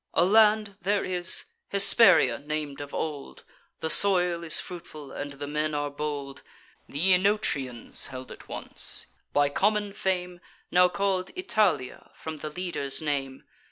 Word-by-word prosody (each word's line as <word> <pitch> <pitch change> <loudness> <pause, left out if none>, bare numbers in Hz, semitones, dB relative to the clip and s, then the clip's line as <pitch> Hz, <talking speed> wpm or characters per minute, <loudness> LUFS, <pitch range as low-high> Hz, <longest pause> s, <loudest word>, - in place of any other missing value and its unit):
A 170 - +4
land 210 0 +3
there 200 +3 0
is, 180 -1 0 0.3
Hesperia 200 -3 +6
nam'd 145 -1 -5
of 140 0 -8
old; 150 -3 -5 0.4
The 160 - -1
soil 180 -3 +5
is 160 - +3
fruitful, 155 -5 -9
and 145 0 -6
the 140 +1 -7
men 150 +1 -2
are 145 0 -2
bold 145 -2 -5 0.5
Th' - - -15
Oenotrians 180 - +1
held 130 0 -9
it - - -12
once, - - -4 0.3
by 145 0 +2
common 205 +5 0
fame 180 -2 -3 0.3
Now 180 0 +5
call'd 190 -1 -1
Italia, 215 - -1
from 160 -1 -7
the 155 - -6
leader's 160 -5 -3
name. 140 -3 -3
170 Hz, 140 wpm, -26 LUFS, 145-190 Hz, 0.5 s, Hesperia